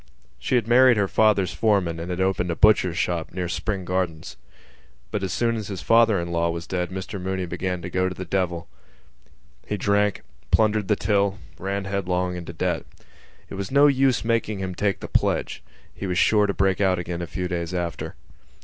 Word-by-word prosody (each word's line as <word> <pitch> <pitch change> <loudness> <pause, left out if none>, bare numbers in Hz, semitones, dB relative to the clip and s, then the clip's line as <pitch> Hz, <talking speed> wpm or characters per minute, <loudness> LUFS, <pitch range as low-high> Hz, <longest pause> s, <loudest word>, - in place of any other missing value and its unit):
She - - -1
had 120 -2 +1
married 125 0 +6
her 100 -1 +2
father's 105 -3 +2
foreman 95 -7 +1
and 85 +2 -5
opened 95 -2 0
a 85 - -1
butcher's 95 -5 +4
shop 85 +1 -2
near 90 -1 -2
Spring 95 +1 -3
Gardens. 90 -3 -2 0.8
But 105 - -2
as 95 - -2
soon 115 -1 +1
as 110 -3 -4
his 95 -3 -6
father 115 0 +4
in 85 0 -4
law 85 0 +1
was 85 +1 -4
dead 90 -1 -2
Mr 95 +1 -6
Mooney 95 0 -2
began 90 0 -3
to 90 - -4
go 95 0 +1
to 90 - -7
the 95 - -6
devil. 85 -2 -1 1.0
He 105 - -2
drank, 100 +1 +1 0.3
plundered 105 -2 +2
the 105 - +3
till, 100 -1 +1 0.2
ran 100 +1 -3
headlong 90 -2 -1
into 85 -1 -6
debt. 80 - -2 0.6
It - - -10
was 100 0 -4
no 140 +2 +5
use 135 -4 +3
making 115 -2 0
him 95 -1 -4
take 100 +2 -1
the - - -5
pledge: - - 0 0.3
he 100 - -5
was 90 -1 -1
sure 105 0 +4
to 100 - 0
break 95 0 +1
out 95 -2 +3
again 85 0 -4
a 85 - -4
few 90 +2 -3
days 85 -1 -3
after. 85 -2 -4
95 Hz, 195 wpm, -24 LUFS, 90-105 Hz, 1.0 s, married